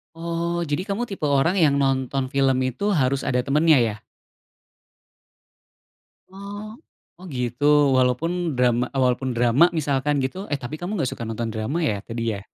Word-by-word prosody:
Oh, 170 +1 -2
jadi 165 +2 -2
kamu 215 +4 -3
tipe 195 -6 -4
orang 145 +6 +2
yang 155 -5 +4
nonton 135 -1 0
film 135 -1 +2
itu 130 - -1
harus 135 -4 +1
ada 125 -1 +1
temennya, 150 +4 +3
ya? 110 -3 0 2.4
Oh. 205 +3 -9 0.4
Oh, 185 - -11
gitu, 125 0 -3 0.3
walaupun 150 +5 0
drama 125 0 +2
walaupun 130 -1 0
drama 120 +9 +4
misalkan, 145 -3 0
gitu 185 +10 -5
eh, 145 - 0
tapi 120 +5 -5
kamu 190 +4 -3
nggak 130 - -1
suka - - -11
nonton 115 +1 -3
drama 110 +8 -2
ya, 105 -9 -1
tadi, 115 0 -5
ya? 100 - -5
140 Hz, 155 wpm, -23 LUFS, 125-170 Hz, 2.4 s, yang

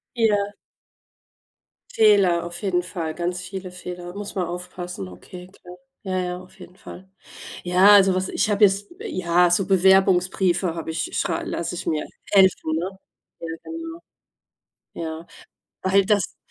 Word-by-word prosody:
Ja. 205 -3 +1 1.4
Fehler, 200 -6 +4
auf 175 +2 -8
jeden 180 -3 +1
Fall, 170 -3 -5
ganz 175 +1 -3
viele 185 +1 -7
Fehler. 180 0 -8
Muss 205 0 -6
man 185 -3 -1
aufpassen. 180 - -6
Okay, 180 - -11
klar. 180 -2 -14 0.3
Ja, 185 -2 -2
ja, 180 0 -3
auf 185 - -19
jeden 180 - -13
Fall. 190 0 -12 0.5
Ja, 180 +3 +5
also 195 -2 +6
was 185 0 -1
ich 215 - 0
habe 205 +1 +4
jetzt 200 - +1
ja, 180 - +2
so 185 +2 +2
Bewerbungsbriefe 190 -2 +3
habe 165 -1 -5
ich 160 - -2
schrei 165 - -1
lasse 170 - -3
ich - - -6
mir 155 -2 -1 0.3
helfen, 190 -5 +4
ne? 185 +4 -4 0.4
Ja, 165 - -6 0.2
genau. 330 +1 -7 0.9
Ja. 160 0 -6 0.6
Weil 195 +1 +3
das 205 -1 0
180 Hz, 145 wpm, -23 LUFS, 175-195 Hz, 1.4 s, also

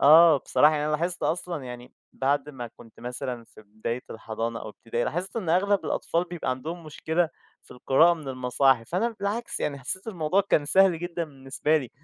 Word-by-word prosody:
آه، 160 +2 +8
بصراحة 150 +3 +4
يعني 150 - 0
أنا 155 - 0
لاحظت 175 +3 -1
أصلًا 170 -4 -2
يعني 125 0 -9 0.2
بَعد 140 +1 0
ما 125 -4 -6
كنت 115 - -16
مثلًا 125 0 -5
في 110 - -17
بداية 110 +4 -4
الحضانة 115 +1 -4
أو - - -7
إبتدائي، 115 +2 -3
لاحظت 180 - -3
إن 200 -7 -2
أغلب 195 +4 +2
الأطفال 170 +2 0
بيبقى 175 -6 -3
عَندهم 160 +7 -5
مشكلة 160 +2 0 0.3
في - - -24
القراءة 135 +7 +4
من 155 -5 -9
المصاحف، 130 -1 +2
فأنا 225 +7 0
بالعكس، 215 +4 -2
يعني 140 -2 -1
حسّيت 185 - -4
الموضوع 180 -2 +1
كان 150 - +4
سهل 185 +2 +4
جدًا 175 0 -3
بالنسبة 140 +1 -1
لي، 130 -6 -3
150 Hz, 185 wpm, -26 LUFS, 125-175 Hz, 0.3 s, آه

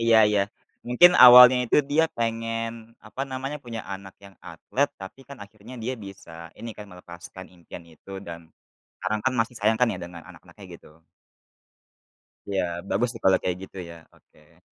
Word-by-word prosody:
Iya 115 -1 +4
iya. 105 -1 +1 0.4
Mungkin 175 +9 +5
awalnya 125 0 +9
itu 120 - +1
dia 160 +3 +3
pengen 115 0 -4
apa 110 +5 -9
namanya, 135 +2 -5
punya 115 -3 -7
anak 95 0 -9
yang 100 -1 -15
atlet 125 - -3
tapi 95 +7 -11
kan 140 - -10
akhirnya 110 +4 -15
dia 120 +3 -3
bisa 95 -4 -13 0.2
ini 115 - -8
kan, 105 - -9
melepaskan 90 0 -12
impian 85 -1 -13
itu 80 +4 -18 0.2
dan 85 0 -8 0.6
karena 100 +3 -1
kan 130 - +1
masih 115 +2 -2
sayang 110 +2 +1
kan 125 - +3
ya, 95 - -6
dengan 85 -1 -10
anak-anaknya - - -16
gitu. 80 +2 -21 1.5
Iya, 100 -1 -1 0.3
bagus 120 +4 0
sih 115 - -11
kalau 95 -1 +4
kayak 90 -1 -2
gitu 95 - -13
ya, 85 - -11 0.2
oke. - - -27
110 Hz, 165 wpm, -24 LUFS, 95-125 Hz, 1.5 s, awalnya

